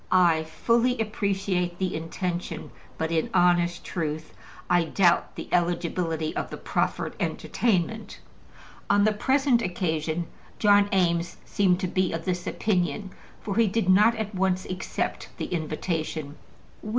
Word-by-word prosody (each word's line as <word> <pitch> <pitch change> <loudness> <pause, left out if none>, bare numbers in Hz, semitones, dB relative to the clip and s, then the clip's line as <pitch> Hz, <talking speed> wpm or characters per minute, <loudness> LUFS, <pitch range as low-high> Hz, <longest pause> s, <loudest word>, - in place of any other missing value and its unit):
I 170 -4 +4
fully 235 +9 +1
appreciate 195 -5 -1
the 185 -1 -1
intention, 175 +2 -4 0.3
but 160 0 -2
in 160 -1 0
honest 175 -1 +3
truth, 155 -2 -4 0.3
I 175 -1 +3
doubt 175 +1 +2
the - - -6
eligibility 170 -2 0
of - - -3
the - - -6
proffered - - -1
entertainment. 215 0 -1 0.7
On 205 - +4
the 215 0 +3
present 265 +2 +2
occasion 170 -3 -1 0.3
John 205 -1 +5
Eames 175 -3 +1
seemed 185 -3 +2
to 185 - 0
be 185 -1 0
of 165 0 -4
this 180 -1 -2
opinion, 185 -1 -1 0.3
for 205 -1 -3
he 230 -1 +5
did 200 -1 0
not 210 +5 +6
at 220 -1 -4
once 185 0 0
accept 185 0 -3
the - - -3
invitation. 155 -2 -3
180 Hz, 135 wpm, -26 LUFS, 170-205 Hz, 0.7 s, not